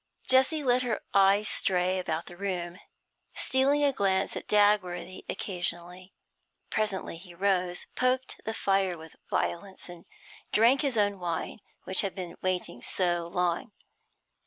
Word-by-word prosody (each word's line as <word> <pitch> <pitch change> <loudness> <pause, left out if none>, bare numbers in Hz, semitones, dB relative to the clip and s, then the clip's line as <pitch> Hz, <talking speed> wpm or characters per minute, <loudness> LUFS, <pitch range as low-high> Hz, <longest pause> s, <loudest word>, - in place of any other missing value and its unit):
Jessie 265 +4 +4
let 250 -1 +3
her 240 -3 -1
eyes 200 +1 +5
stray 185 0 +1
about 165 -2 -3
the 175 - -11
room, 180 -2 -4 0.6
stealing 275 +2 +2
a 280 -1 +3
glance 195 -3 +1
at - - -6
Dagworthy 195 -3 +2
occasionally. 180 0 -4 0.6
Presently 205 -5 -1
he 175 0 -13
rose, 180 -1 0
poked 255 +1 0
the 220 - -3
fire 195 -4 +1
with 160 0 -12
violence, 190 +1 -3
and 175 -1 -11 0.5
drank 235 +5 +5
his 270 -5 0
own 205 -2 +1
wine, 175 +3 -3 0.2
which 190 - +2
had 195 -2 -3
been 180 -3 -6
waiting 180 -9 -2
so 175 0 0
long. 175 +2 -1
190 Hz, 135 wpm, -28 LUFS, 175-215 Hz, 0.6 s, eyes